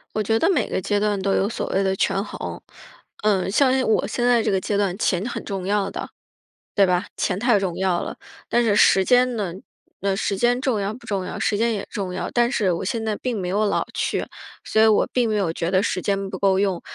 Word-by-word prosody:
我 215 - +1
觉 225 +2 +1
得 390 - +2
每 - - +1
个 - - -1
阶 205 +2 0
段 205 -2 0
都 195 0 +1
有 195 - +2
所 220 - -4
谓 195 +1 +1
的 190 0 +1
权 195 - 0
衡。 - - -7 0.6
呃， 195 -3 +2
像 260 +3 +4
像 - - 0
我 - - +2
现 240 - -1
在 245 -2 +4
这 - - +1
个 190 - +2
阶 205 - -2
段 195 -2 0
钱 190 -3 0
很 - - -6
重 195 -3 -4
要 200 0 0
的， - - -6 0.7
对 200 -2 +5
吧？ 180 0 +1
钱 185 -1 -1
太 240 -2 +3
重 185 -3 -3
要 185 -2 +1
了。 - - -6 0.3
但 240 - +3
是 210 -3 +2
时 190 -2 +5
间 250 -1 +3
呢， 190 -5 -2 0.5
呃， 195 -1 0
时 200 -1 -1
间 240 +4 +2
重 255 -7 0
要 200 +2 -2
不 235 0 -13
重 195 -3 -1
要？ - - -6
时 205 - +1
间 230 +1 +1
也 200 - -4
重 190 -3 -4
要， 185 - -3
但 240 +1 +2
是 195 -8 +1
我 170 - -3
现 225 +3 -2
在 215 -1 -1
并 240 -3 -3
没 180 - -3
有 205 +4 +1
老 - - 0
去， - - -1 0.4
所 220 - +2
以 - - +7
我 215 - +3
并 245 -3 +2
没 215 - 0
有 175 -5 0
觉 170 +1 -2
得 185 0 +3
时 185 - -1
间 195 -1 -1
不 185 - -5
够 190 -1 +3
用。 195 -3 0
200 Hz, 275 characters per minute, -22 LUFS, 190-225 Hz, 0.7 s, 以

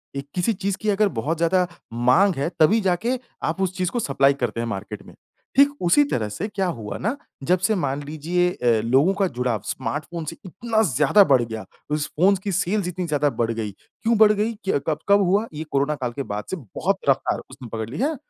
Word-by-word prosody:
ए 140 - -2
किसी 185 +5 +1
चीज़ 200 -1 -2
की 215 - 0
अगर 210 +1 +3
बहुत 160 +7 -1
ज़्यादा 180 +2 +2 0.3
माँग 125 +12 +4
है 140 +4 -1
तभी 195 +9 +5
जाके 210 +7 0 0.2
आप 165 +4 -1
उस 185 -1 -1
चीज़ 180 -2 0
को 245 - -1
सप्लाई 135 - +3
करते 115 -1 -1
हैं 115 - -3
मार्केट 105 -1 -6
में। - - -14 0.4
ठीक 280 +1 +7
उसी 180 +12 +5
तरह 110 -3 -1
से 165 - -4
क्या 200 -3 -2
हुआ 105 -2 -6
ना 220 +8 -1 0.3
जब 180 +6 +2
से 185 +4 +1
मान 145 -5 -2
लीजिए 160 +5 0
अ, 120 -9 +1
लोगों 135 +10 +4
का 195 -1 +1
जुड़ाव 125 - -2
स्मार्ट 145 +3 -3
फ़ोन 170 -2 -6
से 165 - -5
इतना 220 +5 -1
ज़्यादा 150 - +4
बढ़ 135 -5 +4
गया, 110 -3 -6 0.3
उस 150 0 0
फ़ोन 190 +5 +5
की 200 - -2
सेल्स 185 +2 0
इतनी 180 0 -4
ज़्यादा 145 -1 +2
बढ़ 115 -4 -1
गई, 110 -2 -3 0.3
क्यों 230 0 +3
बढ़ 215 0 +7
गई? 210 +2 0 0.2
क 140 - +2
कब 155 -2 0
कब 200 0 +6
हुआ? 200 +4 +2
ये 155 +1 -4
कोरोना 140 +2 +1
काल 130 -4 -3
के 140 - -4
बाद 105 -3 -4
से - - 0
बहुत 165 - -2
रफ़्तार 135 - +1
उसने 130 -2 -10
पकड़ 110 0 -3
ली 130 - -7
है। 300 +5 +1
165 Hz, 225 wpm, -23 LUFS, 130-195 Hz, 0.4 s, ठीक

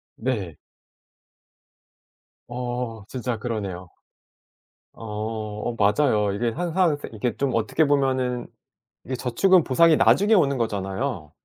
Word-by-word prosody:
네. 105 - -3 1.9
어 120 -3 -4
진짜 125 -2 -3
그러네요. 100 -6 -4 1.1
어. 110 -1 -5
어 - - -8
맞아요. 105 -1 +2
이게 115 +3 0
항상 175 +3 +1
쎄 - - -8
이게 110 +1 -2
좀 135 -2 0
어떻게 115 +8 +1
보면은 130 -3 0 0.6
이제 130 - -3
저축은 165 +9 +3
보상이 160 +4 +4
나중에 210 +3 +4
오는 140 -9 +3
거잖아요. 100 - -3
120 Hz, 230 characters per minute, -24 LUFS, 105-140 Hz, 1.9 s, 보상이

